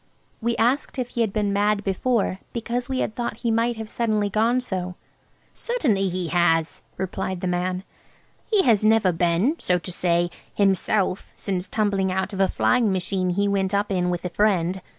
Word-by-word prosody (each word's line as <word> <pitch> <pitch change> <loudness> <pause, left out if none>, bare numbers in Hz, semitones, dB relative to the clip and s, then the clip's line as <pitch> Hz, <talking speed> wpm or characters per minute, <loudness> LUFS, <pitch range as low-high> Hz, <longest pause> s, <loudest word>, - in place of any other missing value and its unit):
We 235 +1 0
asked 250 +5 +1
if 250 -2 -2
he 235 - -2
had 220 -3 +1
been 205 -1 0
mad 205 0 +1
before, 195 0 0
because 240 +2 -3
we 260 -1 0
had - - -2
thought 240 +1 -4
he 230 - +3
might 230 +1 +1
have 220 -1 -5
suddenly 215 -3 0
gone 230 +4 +2
so. 185 -7 -4 0.6
"Certainly 240 - 0
he 180 -2 -2
has!" 165 -2 +2 0.2
replied 190 0 -3
the - - -2
man; 180 +1 -1 0.6
"he 420 -4 +3
has 220 -6 +3
never 215 -3 +4
been, 175 - +1
so 180 - +2
to 180 +1 -5
say, 175 0 +1 0.2
himself 195 -1 +1
since 190 -2 -3
tumbling 200 -2 0
out 190 +2 -2
of 195 - -5
a 195 - +5
flying 235 0 +2
machine 185 0 -1
he 200 +3 +1
went 195 0 0
up 200 0 0
in 180 -2 +1
with 175 0 -3
a - - -1
friend. 185 -1 +1
200 Hz, 185 wpm, -24 LUFS, 185-225 Hz, 0.6 s, a